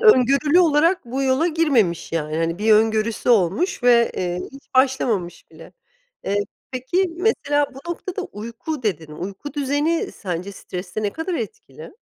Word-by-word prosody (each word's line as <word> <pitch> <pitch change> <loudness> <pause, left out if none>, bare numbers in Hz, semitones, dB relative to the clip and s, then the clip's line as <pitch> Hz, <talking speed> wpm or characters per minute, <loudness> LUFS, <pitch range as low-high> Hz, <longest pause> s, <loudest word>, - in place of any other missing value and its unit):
öngörülü 290 - +5
olarak 330 +1 +3
bu 255 +3 -3
yola 265 +4 +2
girmemiş, 275 - +1
yani, 155 -1 -2
hani, 165 +1 -1
bir 215 +1 +3
öngörüsü 220 +1 +2
olmuş 235 - +2
ve, 240 -1 +5
eee, 180 0 -2
hiç 275 +1 -14
başlamamış 245 -9 +1
bile. 165 0 -14 0.5
Eee, 205 +1 0 0.3
peki, 330 +8 0
mesela 290 -7 +1
bu 280 +6 -8
noktada 370 +3 -4
uyku 250 - -6
dedin, 165 -8 -2
uyku 195 - -7
düzeni 290 +3 0
sence 185 0 -5
streste 180 +2 -6
ne 205 - 0
kadar 335 +3 -3
etkili? 445 +6 -7
250 Hz, 145 wpm, -22 LUFS, 195-310 Hz, 0.5 s, öngörülü